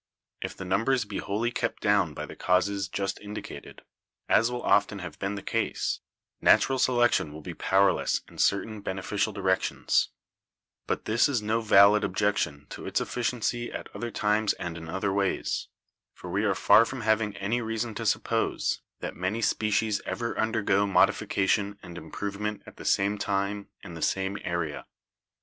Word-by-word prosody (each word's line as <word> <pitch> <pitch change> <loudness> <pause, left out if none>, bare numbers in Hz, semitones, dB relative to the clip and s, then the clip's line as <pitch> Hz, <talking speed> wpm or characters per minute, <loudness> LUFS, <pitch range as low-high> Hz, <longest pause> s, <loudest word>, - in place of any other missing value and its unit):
If - - -5
the 95 - -6
numbers 115 +6 +1
be - - -5
wholly 110 +4 -1
kept - - -3
down - - +2
by - - -4
the - - -10
causes 95 +2 +1
just 100 0 -3
indicated, 105 +1 -8 0.4
as 115 +2 +4
will 125 0 -4
often 100 0 +3
have 90 -2 -8
been 100 +1 -2
the 100 - -6
case, 115 +2 -1 0.4
natural 135 -1 +4
selection 120 -11 +3
will 75 +1 -9
be 90 - -6
powerless 95 +3 +2
in - - -14
certain 105 +1 +1
bene 95 -1 -4
ficial 105 +2 0
directions; 95 -2 +1 0.8
but - - -2
this 115 +5 +3
is 120 -6 0
no 110 +2 +1
valid 105 0 +6
objection 90 -7 0
to - - -7
its - - +1
effi 125 - -3
ciency 120 0 -1
at - - -8
other 120 - -3
times 105 -1 +1
and 85 -1 -5
in 80 -1 -8
other 95 +3 -1
ways, 100 -1 -1 0.5
for 90 - -8
we 100 +4 +1
are 100 -2 +2
far 110 +3 +6
from 125 +2 -5
having 110 -1 +1
any 110 +5 -1
reason 115 0 -2
to - - -5
suppose - - 0 0.2
that - - -4
many 95 +5 -2
species 110 -1 +1
ever 115 -1 -2
undergo 110 -3 +1
modification 100 +1 +2
and 90 -2 -9
improvement 100 +3 -4
at - - -13
the - - -10
same 100 +1 +2
time 100 0 -1 0.2
in 85 - -9
the 80 - -8
same 95 +4 0
area." 85 -4 -3
100 Hz, 170 wpm, -27 LUFS, 95-110 Hz, 0.8 s, valid